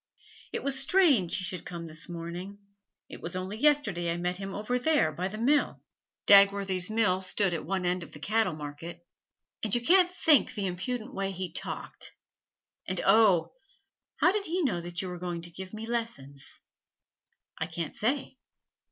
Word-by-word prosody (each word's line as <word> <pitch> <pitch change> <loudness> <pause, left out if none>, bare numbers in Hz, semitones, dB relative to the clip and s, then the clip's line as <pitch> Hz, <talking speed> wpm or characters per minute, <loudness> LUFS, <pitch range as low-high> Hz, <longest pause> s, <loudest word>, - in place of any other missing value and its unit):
'It - - -4
was 275 -1 +1
strange 275 - +3
he 190 - -3
should 180 -1 -3
come 170 -1 -7
this 160 +2 -3
morning. 175 +4 -6 0.5
It - - -10
was 170 +2 -3
only 185 +2 -4
yesterday 225 - +2
I 170 - -2
met 180 +1 -2
him 195 0 -6
over 215 +6 -2
there 295 - +2
by 175 +5 -3
the 205 +3 -7
mill,' 280 +6 +2 0.5
Dagworthy's 200 -2 +5
mill 205 -4 +2
stood 190 0 +1
at 165 - -4
one 190 0 -1
end 180 0 0
of 170 - -9
the - - -8
cattle 215 +2 +1
market, 160 +3 -8 0.6
'and 215 -1 0
you - - +3
can't 360 +7 +5
think 315 -7 +3
the 205 - -2
impudent 220 +8 -4
way 195 -3 -2
he 185 -2 -5
talked. - - -6 0.7
And, 185 -1 -1
oh, 195 -4 +4 0.6
how 360 - +4
did 410 0 -2
he 350 +2 -1
know 200 - 0
that 175 +2 -4
you - - -4
were 180 -1 -6
going 175 -1 -4
to 170 - -7
give 185 +2 -8
me 220 +1 -6
lessons?' 225 - -3 1.0
'I 160 - -2
can't 165 -2 -5
say.' 260 +3 -1
190 Hz, 180 wpm, -29 LUFS, 175-230 Hz, 1.0 s, Dagworthy's